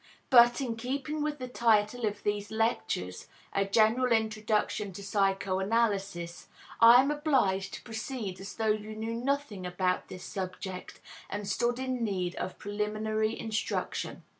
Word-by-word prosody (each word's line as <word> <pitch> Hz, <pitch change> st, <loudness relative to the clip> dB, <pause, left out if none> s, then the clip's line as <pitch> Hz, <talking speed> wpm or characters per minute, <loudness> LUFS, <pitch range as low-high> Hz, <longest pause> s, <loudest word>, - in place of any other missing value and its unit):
But, 240 Hz, 0 st, +7 dB
in 235 Hz, -4 st, -2 dB
keeping 275 Hz, +5 st, -3 dB
with 300 Hz, 0 st, -1 dB
the 255 Hz, -2 st, -5 dB
title 230 Hz, -1 st, +2 dB
of 205 Hz, 0 st, -4 dB
these 205 Hz, 0 st, -1 dB
lectures 220 Hz, -, -1 dB, 0.3 s
A 195 Hz, -, +2 dB
General 225 Hz, +5 st, +3 dB
Introduction 215 Hz, -2 st, 0 dB
to 200 Hz, -, -8 dB
Psychoanalysis 195 Hz, -2 st, 0 dB, 0.3 s
I 235 Hz, +2 st, +9 dB
am 280 Hz, -, 0 dB
obliged 265 Hz, -11 st, +1 dB
to -, -, -10 dB
proceed 220 Hz, -4 st, -5 dB
as 195 Hz, +1 st, -8 dB
though 220 Hz, -1 st, +1 dB
you 215 Hz, 0 st, -6 dB
knew 220 Hz, +1 st, -3 dB
nothing 250 Hz, -4 st, -2 dB
about 180 Hz, 0 st, -1 dB
this 180 Hz, -, -9 dB
subject, 185 Hz, -1 st, -6 dB, 0.3 s
and 205 Hz, 0 st, -4 dB
stood 240 Hz, +4 st, +1 dB
in 255 Hz, -2 st, -2 dB
need 185 Hz, -5 st, -1 dB
of 185 Hz, -, -4 dB
preliminary 215 Hz, +1 st, -1 dB
instruction. 220 Hz, 0 st, -3 dB
215 Hz, 140 wpm, -30 LUFS, 195-240 Hz, 0.3 s, I